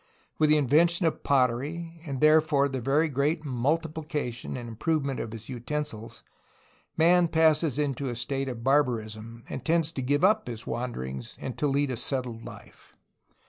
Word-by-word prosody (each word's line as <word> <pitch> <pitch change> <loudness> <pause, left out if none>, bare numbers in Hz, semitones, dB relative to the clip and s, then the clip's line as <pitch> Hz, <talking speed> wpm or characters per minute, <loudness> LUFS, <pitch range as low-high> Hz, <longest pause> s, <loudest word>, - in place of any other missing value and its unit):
With 155 -1 +4
the 155 - +6
invention 165 +5 +3
of 160 - 0
pottery 145 +6 0
and 135 -2 -3
therefore 155 -2 +4
the 130 -2 -4
very 140 +6 +2
great 150 +3 0
multipli 155 +4 -1
cation 125 -5 -3
and 120 -1 -7
improvement 140 +4 -1
of 110 - -4
his 110 -1 -8
utensils, 125 -2 -5 0.7
man 175 +2 +5
passes 160 -3 +3
into 140 -2 -1
a 120 - -4
state 135 +3 -2
of 115 -2 -6
barbarism, 115 -4 0
and - - -6
tends 165 -1 +2
to 140 - -4
give 145 +5 +1
up 215 +3 +4
his 115 -2 -6
wanderings 65 - -5
and 130 - -5
to 150 - +2
lead 140 0 +1
a 125 - -3
settled 125 -3 -2
life. - - -13
140 Hz, 165 wpm, -27 LUFS, 120-155 Hz, 0.7 s, the